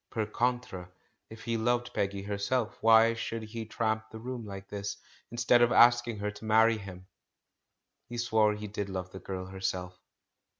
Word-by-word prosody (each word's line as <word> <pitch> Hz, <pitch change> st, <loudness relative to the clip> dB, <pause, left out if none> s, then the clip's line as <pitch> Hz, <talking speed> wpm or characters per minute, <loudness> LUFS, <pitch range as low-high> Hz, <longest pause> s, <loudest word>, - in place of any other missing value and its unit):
Per 110 Hz, -4 st, -2 dB
contra, 115 Hz, -5 st, -2 dB, 0.4 s
if 110 Hz, 0 st, -11 dB
he 115 Hz, -1 st, -1 dB
loved 120 Hz, +2 st, 0 dB
Peggy 100 Hz, -1 st, -2 dB
herself, 105 Hz, +4 st, -1 dB
why 115 Hz, 0 st, +6 dB
should 115 Hz, 0 st, -4 dB
he 110 Hz, 0 st, -6 dB
tramp 110 Hz, -1 st, -1 dB
the 110 Hz, -, -9 dB
room 120 Hz, +1 st, -6 dB
like 95 Hz, -1 st, -8 dB
this, 100 Hz, -1 st, -5 dB, 0.3 s
instead 120 Hz, +1 st, +3 dB
of 120 Hz, 0 st, +4 dB
asking 120 Hz, -1 st, +5 dB
her 105 Hz, 0 st, -2 dB
to 105 Hz, +2 st, -11 dB
marry 110 Hz, +1 st, +4 dB
him? 95 Hz, -2 st, -10 dB, 1.0 s
He 120 Hz, -, -6 dB
swore 110 Hz, -3 st, +2 dB
he 105 Hz, 0 st, -7 dB
did 100 Hz, -1 st, -4 dB
love 90 Hz, -1 st, -5 dB
the 95 Hz, -, -8 dB
girl 95 Hz, -1 st, -5 dB
herself. 95 Hz, -1 st, -4 dB
110 Hz, 170 wpm, -30 LUFS, 100-115 Hz, 1.0 s, why